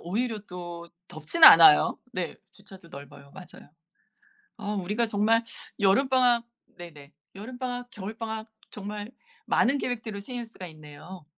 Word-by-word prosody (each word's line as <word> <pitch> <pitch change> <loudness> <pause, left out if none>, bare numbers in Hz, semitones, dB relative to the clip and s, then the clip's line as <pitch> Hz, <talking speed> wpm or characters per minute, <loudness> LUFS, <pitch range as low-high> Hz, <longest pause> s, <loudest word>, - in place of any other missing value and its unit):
오히려 220 +5 -3
또 175 -1 -9 0.2
덥지는 155 - +4
않아요. 165 - +7
네. 180 -5 -4 0.2
주차도 195 -3 -16
넓어요. 140 -1 -13
맞아요. 185 -2 -13 0.9
아 210 -1 -5
우리가 210 +5 -1
정말 220 +1 +1 0.4
여름방학 245 +3 +3 0.3
네네. 150 -4 -13 0.2
여름방학 245 +3 -7
겨울방학 220 +2 -7 0.2
정말 205 +2 -8 0.4
많은 270 +4 +2
계획들을 225 -6 -5
세울 245 +2 -7
수가 195 -5 -11
있네요. 155 +3 -13
205 Hz, 290 characters per minute, -26 LUFS, 175-235 Hz, 0.9 s, 않아요